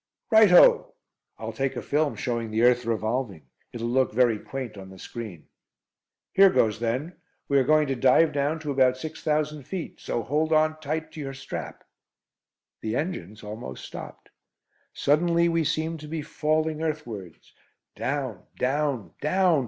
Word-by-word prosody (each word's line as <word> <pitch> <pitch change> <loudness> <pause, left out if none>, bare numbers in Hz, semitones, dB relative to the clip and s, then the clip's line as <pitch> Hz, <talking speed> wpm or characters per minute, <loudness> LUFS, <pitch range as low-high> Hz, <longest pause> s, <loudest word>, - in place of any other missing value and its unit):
"Right 220 -2 +7
ho!" - - +6 0.4
"I'll - - -5
take 135 -1 -1
a - - -3
film 150 0 0
showing 115 -3 -2
the 110 +2 0
earth 125 0 +4
revolving. 110 - -2 0.3
It'll 115 0 -4
look 130 0 +2
very 115 -2 +3
quaint 130 -3 -6
on 95 -1 -10
the 95 - -12
screen." 105 -5 -8 0.9
"Here 195 0 +7
goes 110 - +2
then. 125 +9 -2 0.3
We 140 -1 +3
are - - +3
going 155 +3 +4
to 135 - -1
dive 135 +6 +4
down 145 +3 0
to 150 -2 -3
about 130 -2 +3
six 155 +4 -7
thousand 150 -1 0
feet, 185 +2 -6
so 115 - -3
hold 155 +7 0
on 155 0 +2
tight 155 +1 -3
to - - -10
your 135 -2 -5
strap." 135 - -7 1.0
The 110 +1 -2
engines 110 - -4
almost 105 -12 -7
stopped. - - -10 0.6
Suddenly 170 +4 +2
we 165 -1 +1
seemed 160 +1 -1
to 150 - -9
be 155 0 -4
falling 155 +1 -1
earthwards. 120 - -5 0.4
Down 130 -8 -3
down 130 - -1
down! 180 0 +3
140 Hz, 160 wpm, -26 LUFS, 115-155 Hz, 1.0 s, Right